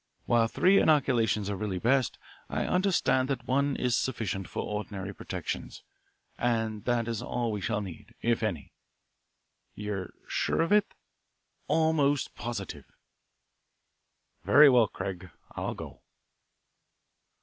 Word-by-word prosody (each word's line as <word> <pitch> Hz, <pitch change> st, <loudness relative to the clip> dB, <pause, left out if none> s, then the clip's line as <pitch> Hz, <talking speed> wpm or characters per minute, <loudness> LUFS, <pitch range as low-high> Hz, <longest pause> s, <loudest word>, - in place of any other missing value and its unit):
While 115 Hz, -1 st, +3 dB
three 190 Hz, -, +4 dB
inoculations 115 Hz, -, +2 dB
are 100 Hz, -, -2 dB
really 100 Hz, -2 st, -3 dB
best, 130 Hz, +6 st, +1 dB, 0.3 s
I -, -, -1 dB
understand 180 Hz, -8 st, +2 dB
that 135 Hz, -, -2 dB
one 140 Hz, +1 st, +1 dB
is 125 Hz, -1 st, +1 dB
sufficient 100 Hz, -7 st, -2 dB
for -, -, -3 dB
ordinary 100 Hz, -2 st, -4 dB
protection, -, -, -5 dB, 0.7 s
and 110 Hz, -3 st, -1 dB
that 120 Hz, -2 st, +1 dB
is 115 Hz, -2 st, -2 dB
all 120 Hz, -2 st, -2 dB
we 105 Hz, -2 st, -3 dB
shall 105 Hz, +2 st, -1 dB
need, 95 Hz, -5 st, -9 dB
if 115 Hz, -1 st, +1 dB
any." 95 Hz, -10 st, -3 dB, 1.0 s
"You're 100 Hz, -3 st, -4 dB, 0.2 s
sure -, -, 0 dB
of 165 Hz, -, -2 dB
it?" 210 Hz, 0 st, +3 dB, 0.7 s
"Almost 150 Hz, -4 st, +2 dB
positive." 100 Hz, -, -6 dB, 1.6 s
"Very 140 Hz, -, +7 dB
well, 120 Hz, -3 st, +5 dB
Craig. 95 Hz, -2 st, -6 dB, 0.2 s
I'll -, -, -4 dB
go." -, -, -9 dB
115 Hz, 120 wpm, -29 LUFS, 100-135 Hz, 1.6 s, Very